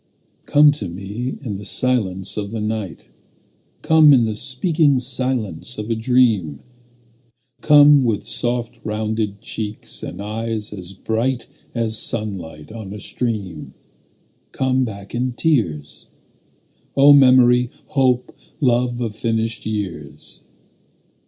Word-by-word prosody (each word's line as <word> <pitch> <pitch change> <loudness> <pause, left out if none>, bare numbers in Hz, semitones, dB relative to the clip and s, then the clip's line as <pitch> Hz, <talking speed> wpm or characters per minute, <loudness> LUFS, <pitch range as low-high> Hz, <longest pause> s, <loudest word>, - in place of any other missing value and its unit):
Come 150 0 +6
to 145 - -5
me 100 +8 -5
in 105 -6 -4
the - - -9
silence 100 -7 -1
of 100 -2 -4
the 115 +1 -5
night; 105 -5 -4 0.8
Come 155 -2 +6
in 120 -4 +4
the 110 - -2
speaking 145 - +1
silence 125 -5 -2
of 105 +2 -4
a - - +1
dream; 110 - +1 1.0
Come 145 -2 +7
with 115 -4 0
soft 120 -1 -3
rounded 105 -1 -3
cheeks 105 -1 -6
and - - -7
eyes 110 +1 -4
as 95 -2 -8
bright 115 +6 -2 0.3
As 115 -2 +1
sunlight 95 -9 -3
on 110 -3 -8
a - - -8
stream; 100 -10 -4 0.8
Come 130 0 +1
back 100 -3 -9
in 125 +1 -1
tears, 90 - -1 0.9
O 140 +1 +8
memory, 125 -3 +5 0.2
hope, 130 -3 +1 0.2
love 120 -2 +1
of 110 -3 -3
finished 115 -1 -2
years. 95 -9 -6
115 Hz, 120 wpm, -20 LUFS, 105-125 Hz, 1.0 s, O